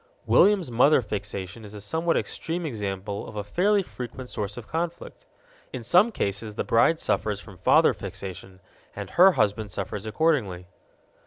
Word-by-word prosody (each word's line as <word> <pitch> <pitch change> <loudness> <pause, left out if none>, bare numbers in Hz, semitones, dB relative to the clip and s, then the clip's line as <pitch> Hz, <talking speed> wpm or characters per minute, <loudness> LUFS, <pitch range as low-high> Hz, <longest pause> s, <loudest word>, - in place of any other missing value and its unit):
William's 195 -9 +4
mother 135 +6 +5
fixation 105 -2 -5
is 105 0 -10
a - - -7
somewhat 160 +12 0
extreme 170 +1 -3
example 100 -5 -4
of 110 - -11
a 105 - -3
fairly 195 - +2
frequent 125 -4 -8
source 105 0 -4
of 120 - -8
conflict. 170 +1 -5 0.4
In 125 - -6
some 180 - +4
cases 105 - -3
the - - -1
bride 155 +8 +3
suffers 105 -2 -1
from 100 -3 -13
father - - +5
fixation, 95 -1 -8 0.3
and - - -7
her 185 +2 +6
husband 105 -3 0
suffers 105 +3 -5
accordingly. 110 - 0
110 Hz, 155 wpm, -26 LUFS, 100-160 Hz, 0.4 s, her